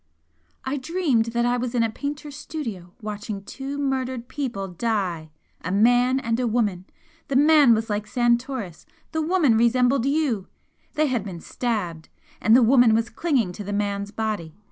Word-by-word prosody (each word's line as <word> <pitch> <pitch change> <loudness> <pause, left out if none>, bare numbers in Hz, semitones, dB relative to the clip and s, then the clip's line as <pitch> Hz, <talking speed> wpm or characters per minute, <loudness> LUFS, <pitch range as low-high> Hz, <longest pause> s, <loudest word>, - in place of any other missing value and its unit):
"I 265 +2 -1
dreamed 285 -5 +1
that 235 +1 0
I 245 0 +2
was 245 0 -3
in 235 - +3
a 225 - 0
painter's 290 +3 -5
studio 225 - -6
watching 210 -1 -5
two 275 +6 -6
murdered 260 -3 -2
people 250 -8 -4
die 180 -5 -2 0.3
a 180 - -3
man 245 +5 +4
and 230 -2 -1
a 250 - +1
woman. 210 -6 0 0.4
The 275 - -2
man 290 -4 +6
was 220 0 -2
like 210 0 -2
Santoris 240 - -1 0.2
the 320 - -1
woman 315 -7 +3
resembled 245 +2 +3
you! 275 -9 0 0.5
They 310 0 +3
had 250 -7 0
been 185 -4 -7
stabbed, 180 -9 -3 0.3
and 225 - +5
the 250 - +6
woman 240 -2 +5
was 230 +1 0
clinging 250 - 0
to 205 - -7
the 205 +1 -4
man's 200 0 -2
body. 205 -7 -3
235 Hz, 165 wpm, -24 LUFS, 205-270 Hz, 0.5 s, man